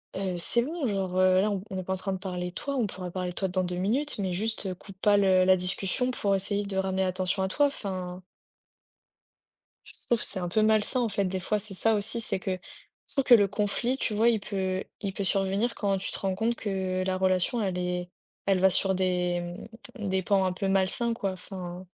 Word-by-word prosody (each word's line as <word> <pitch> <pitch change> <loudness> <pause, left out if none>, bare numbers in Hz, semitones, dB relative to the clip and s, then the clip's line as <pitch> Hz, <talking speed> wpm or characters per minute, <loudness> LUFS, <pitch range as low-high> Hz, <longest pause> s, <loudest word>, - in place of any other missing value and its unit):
heu, 190 -2 -2
c'est 235 +7 +2
bon, 300 0 -3
genre, 190 -3 -2
heu, 185 0 +5
là, 210 +1 +1
on 195 -2 -3
n'est 185 - -3
pas 190 - -2
en - - 0
train 195 +1 -2
de 190 - -2
parler 180 -2 -4
toi, 280 +9 -4
on 240 -6 +1
pourra 180 -2 -7
parler 180 -1 -3
de 175 - -8
toi 190 - -1
dans 185 0 0
2 180 0 -2
minutes, 245 +11 0
mais 190 -3 -2
juste 205 -1 -1
coupe 190 +1 -13
pas 205 -1 +5
le 190 -2 +4
la 185 0 +6
discussion 190 +7 0
pour 200 -5 0
essayer 200 +1 +1
de 195 -1 -4
ramener 190 0 0
l'attention 185 +1 0
à - - +1
toi, 285 +9 +3
enfin 185 -7 -5 1.6
je - - -15
trouve 235 -2 +1
c'est 195 - +2
un 175 - -2
peu 215 +4 +1
malsain 220 +3 +3
en 235 - +1
fait 200 -1 0
des 185 0 -2
fois. 210 +4 0
C'est 205 -1 -1
ça 225 +4 +3
aussi, 220 +3 +1
c'est 215 - 0
que 190 0 -3 0.5
je - - -5
trouve 275 -2 +1
que 245 - +8
le 205 -3 +5
conflit, 210 +6 -1
tu 215 - -1
vois, 225 +3 +4
il 225 -3 +2
peut 190 -2 -2 0.2
il 200 -2 -3
peut 200 - -3
survenir 195 +5 +1
quand 200 -2 0
tu 195 - -2
te - - -4
rends 190 -1 -1
compte 225 +4 0
que 190 -3 -2
la 185 - 0
relation 185 +5 +1
elle 185 -2 -1
est 180 0 -2 0.4
elle 195 -2 +3
va 190 0 +5
sur 190 +1 +3
des 180 -1 0 0.6
des 190 -2 -1
pans 195 +1 +2
un 185 - +1
peu 195 +1 -2
malsains, 195 +5 +2
quoi, 195 -4 -2
enfin 180 -1 -8
190 Hz, 230 wpm, -28 LUFS, 185-210 Hz, 1.6 s, que